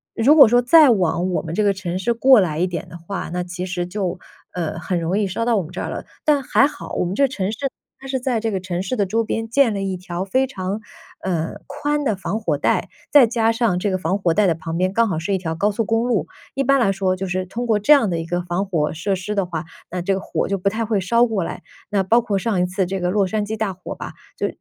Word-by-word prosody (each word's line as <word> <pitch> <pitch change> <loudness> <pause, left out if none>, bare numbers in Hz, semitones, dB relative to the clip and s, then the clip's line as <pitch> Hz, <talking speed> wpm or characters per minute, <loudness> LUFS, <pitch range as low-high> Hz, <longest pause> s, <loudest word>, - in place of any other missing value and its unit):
如 250 +6 +5
果 280 -5 +9
说 245 +2 +4
再 300 +3 +7
往 185 -3 +1
我 180 - 0
们 160 - -6
这 215 - +2
个 200 - +3
城 185 -2 -4
市 235 +5 +1
过 255 +1 +6
来 160 -5 0
一 180 - +3
点 180 0 -5
的 170 - -11
话， 175 +4 -5
那 180 0 -1
其 180 +1 -5
实 180 -1 -3
就， 185 -2 -3 0.4
呃， 165 -3 -3
很 175 +1 -2
容 170 +4 0
易 210 - +1
烧 195 +5 -2
到 235 -1 +2
我 195 - +1
们 155 - -10
这 - - -5
儿 - - -4
了。 - - -5 0.2
但 295 -2 +3
还 270 - +4
好， 300 - -9
我 - - 0
们 180 +1 -2
这 280 - +2
个 - - +5
城 200 -6 -2
市 220 - -6 0.4
它 270 - -14
是 265 -1 -1
在 250 -2 0
这 225 0 -2
个 195 - -1
城 180 -1 -3
市 195 +7 -2
的 200 -5 0
周 225 +4 +1
边 225 0 -3
建 250 -2 +3
了 200 - -3
一 190 -1 -2
条 180 0 -4
非 260 +7 +1
常， 195 -5 -4 0.4
呃， 165 -3 -2
宽 295 +1 -2
的 225 -7 +1
防 195 +3 -3
火 220 - 0
带， - - +1 0.2
再 285 -4 +7
加 225 -1 +1
上 225 -6 +1
这 205 - 0
个 185 - 0
防 185 +2 -1
火 170 -4 +1
带 210 - +4
的 175 - +3
旁 165 +1 -5
边 185 +1 0
刚 230 +2 +3
好 175 - -1
是 170 +5 -2
一 190 - +1
条 160 -3 -3
高 200 +6 +1
速 225 +3 -1
公 225 +2 +1
路。 240 -5 0 0.3
一 275 - 0
般 275 +1 +3
来 225 -5 +3
说 190 -1 0
就 190 +1 -4
是 185 0 -2
通 235 +6 -4
过 220 -3 +2
这 210 +9 +2
样 275 -7 +4
的 165 - -1
一 165 - -5
个 175 +1 -1
防 180 +3 -2
火 160 -5 0
设 185 +5 -1
施 195 +3 -4
的 200 -3 0
话， 165 -2 -4 0.2
那 180 0 -4
这 195 - +1
个 190 - -1
火 - - -2
就 195 -1 -1
不 200 - +1
太 225 +3 -2
会 215 -3 0
烧 235 +6 +3
过 220 -6 -1
来。 - - -6 0.3
那 200 -2 +1
包 230 +6 +4
括 210 -4 -1
上 195 -3 0
一 180 - +1
次 185 +1 -1
这 190 +1 -3
个 180 - 0
洛 200 +1 +2
杉 210 +3 -1
矶 220 +2 -4
大 210 -3 -1
火 185 - -8
吧， - - -7 0.2
就 - - 0
195 Hz, 310 characters per minute, -21 LUFS, 180-230 Hz, 0.4 s, 果